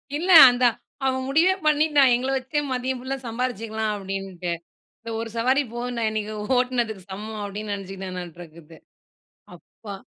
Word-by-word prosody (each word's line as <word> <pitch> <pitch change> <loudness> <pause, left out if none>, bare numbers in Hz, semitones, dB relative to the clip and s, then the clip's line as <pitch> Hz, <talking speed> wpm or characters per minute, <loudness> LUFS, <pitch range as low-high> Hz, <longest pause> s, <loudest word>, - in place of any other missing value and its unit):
இல்ல 340 +5 -3 0.2
அந்த 245 0 +1 0.4
அவன் 260 0 0
முடிவே 330 +7 +4
பண்ணிட்டான். 295 -3 +4
எங்கள 255 +2 -2
வச்சே, 265 +3 -2
மதியம் 255 0 -2
ஃபுல்லா 265 +2 -4
சம்பாரிச்சுக்கலாம், 225 -2 -3
அப்டின்ட்டு. 195 -3 -5 0.5
"இந்த 230 - -8
ஒரு 230 - -4
சவாரி 260 +5 +2
போதுண்டா, 240 -1 -3
இன்னைக்கு 215 0 -4 0.2
ஓட்டுனதுக்கு 240 -5 -1
சமம்" 215 +3 -6
அப்படின்னு 205 +1 -5
நெனச்சுக்கிட்டானாட்ருக்குது. 175 -4 -9 0.8
அப்பா! 205 -3 -11
230 Hz, 125 wpm, -24 LUFS, 195-260 Hz, 0.8 s, முடிவே